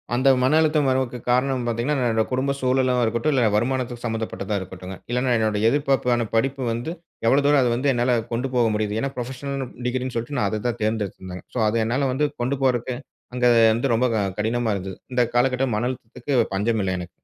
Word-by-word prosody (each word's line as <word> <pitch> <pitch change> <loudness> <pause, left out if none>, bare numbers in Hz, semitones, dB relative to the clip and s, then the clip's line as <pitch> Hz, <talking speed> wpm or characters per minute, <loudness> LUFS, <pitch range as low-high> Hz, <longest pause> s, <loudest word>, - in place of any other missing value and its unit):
அந்த 135 +2 +3
மன 130 +5 +3
அழுத்தம் 150 -3 +2
வரவுக்கு 130 -1 0
காரணம் 130 0 +2
பார்த்தீங்கன்னா, 120 +6 0 0.2
என்னோட 110 0 +2
குடும்ப 130 +2 0
சூழலாவும் 130 -1 +2
இருக்கட்டும், 120 +7 0
இல்ல 125 -4 +3
வருமானத்துக்கு 120 +1 -1
சம்மந்தப்பட்டதா 110 -3 -3
இருக்கட்டுங்க, 95 0 -8 0.2
இல்லன்னா 125 +1 +1
என்னுடைய 110 0 +2
எதிர்பார்ப்பான 130 -5 +1
படிப்பு 135 +4 +1
வந்து 120 +8 -3 0.3
எவ்வளவு 140 +4 +4
தூரம் 145 -1 +5
அத 120 -2 +2
வந்து 135 +3 +1
என்னால 120 0 +2
கொண்டு 125 +3 -1
போக 120 -2 +4
முடியுது. 105 0 -1
ஏன்னா, 135 - -1
ப்ரொஃபஷனல்ன்னு 130 +2 -4 0.2
டிகிரின்னு 130 0 -2
சொல்ட்டு 120 +4 -3
நான் 100 - +2
அத 110 0 -3
தான் 120 0 -2
தேர்ந்தெடுத்திருந்தேங்க. 100 -4 -3
ஸோ, - - 0
அது 115 +2 +1
என்னால 130 +3 0
வந்து 150 +2 +1
கொண்டு 130 +3 0
போறதுக்கு 125 -1 +1 0.4
அங்க 125 -1 +2 0.3
வந்து 120 +4 0
ரொம்ப 125 +3 +2
க - - +1 0.2
கடினமா 115 +1 0
இருந்தது. 95 -1 -5 0.2
இந்த 125 0 +2
காலகட்டம் 125 -1 +2
மன 120 +3 0
அழுத்தத்துக்கு 130 +3 -6 0.2
பஞ்சமில்ல 100 -2 0
எனக்கு. 90 0 -7
125 Hz, 185 wpm, -23 LUFS, 110-130 Hz, 0.4 s, தூரம்